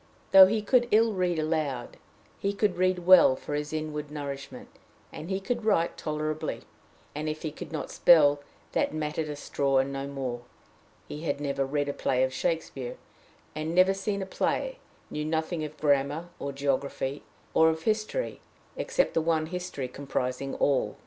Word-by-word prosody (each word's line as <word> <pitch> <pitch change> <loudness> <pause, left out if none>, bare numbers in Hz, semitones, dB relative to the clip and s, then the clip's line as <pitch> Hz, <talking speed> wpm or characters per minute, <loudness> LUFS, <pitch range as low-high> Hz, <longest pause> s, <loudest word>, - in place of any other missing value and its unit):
Though 190 -1 +10
he 215 +1 0
could 240 +2 +3
ill 225 0 +4
read 180 -3 0
aloud, 155 -6 -2 0.4
he 200 0 -1
could 200 -2 +1
read 185 -1 +1
well 180 -7 +8
for 145 - -7
his 150 0 -2
inward 155 -1 -4
nourishment; 140 -2 -7 0.4
he 190 +5 -4
could 235 +4 -3
write 200 -6 +2
tolerably, 155 0 -3 0.5
and, 150 +1 -3
if 155 0 -5
he 155 - -2
could 155 - -9
not 155 -3 -4
spell, 145 -4 +5 0.3
that - - 0
mattered 155 0 -2
a 150 - -4
straw, 140 -1 0
and 135 +1 +1
no 135 0 -4
more; 130 -4 -4 0.7
he 150 - -7
had 145 -3 -2
never 140 -2 -1
read 145 +1 -1
a 140 - -2
play 130 -2 +1
of 130 0 0
Shakespeare 135 -4 -3 0.6
had 155 0 -3
never 185 +3 +4
seen 195 0 -2
a - - -5
play; - - -1 0.3
knew 150 - -3
nothing 160 +1 -1
of 155 0 -7
grammar 145 +3 +1
or 140 - -3
geography 140 0 -2 0.3
or 160 0 +6
of 160 0 -3
history, 215 - -1 0.3
except - - 0
the 165 - +2
one 160 -1 +1
history 180 -6 -4
comprising 135 0 -3
all. 140 -2 +1
155 Hz, 170 wpm, -28 LUFS, 140-180 Hz, 0.7 s, Though